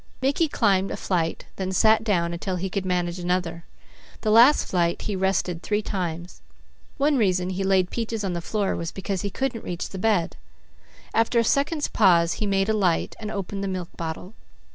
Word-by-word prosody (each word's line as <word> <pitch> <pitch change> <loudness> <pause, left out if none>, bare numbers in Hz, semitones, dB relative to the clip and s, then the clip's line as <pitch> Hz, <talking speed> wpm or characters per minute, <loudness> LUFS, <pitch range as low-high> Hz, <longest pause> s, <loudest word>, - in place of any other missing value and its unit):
Mickey 275 +5 +1
climbed 195 -8 +2
a - - -4
flight, 165 -3 -1
then 190 -1 -2
sat 220 +4 +4
down 170 -6 0
until 185 +2 -3
he 185 +1 -3
could 190 -1 -2
manage 180 -1 -1
another. 175 -1 -2 0.6
The 215 - +1
last 240 +7 +6
flight 170 -2 0
he 210 - -2
rested 185 -2 0
three 210 +2 -1
times. 175 -3 -4 0.6
One 285 +1 +2
reason 185 -4 +1
he 190 +1 -2
laid 190 -2 +2
Peaches 225 -2 -3
on 190 -2 -2
the 170 - -3
floor 205 +2 -1
was 165 -1 -4
because 195 -1 -3
he 200 - -2
couldn't 250 +3 -3
reach 175 -1 -4
the 190 - -7
bed. 200 -5 +1 0.8
After 225 +1 +2
a 230 - +5
second's 290 +5 +1
pause 170 -5 +4
he 210 - -2
made 195 0 +1
a 220 - +2
light, 185 -6 +1
and 215 -2 -5
opened 200 -1 -4
the - - -2
milk 185 -2 -4
bottle. 165 +4 -6
190 Hz, 190 wpm, -24 LUFS, 180-215 Hz, 0.8 s, last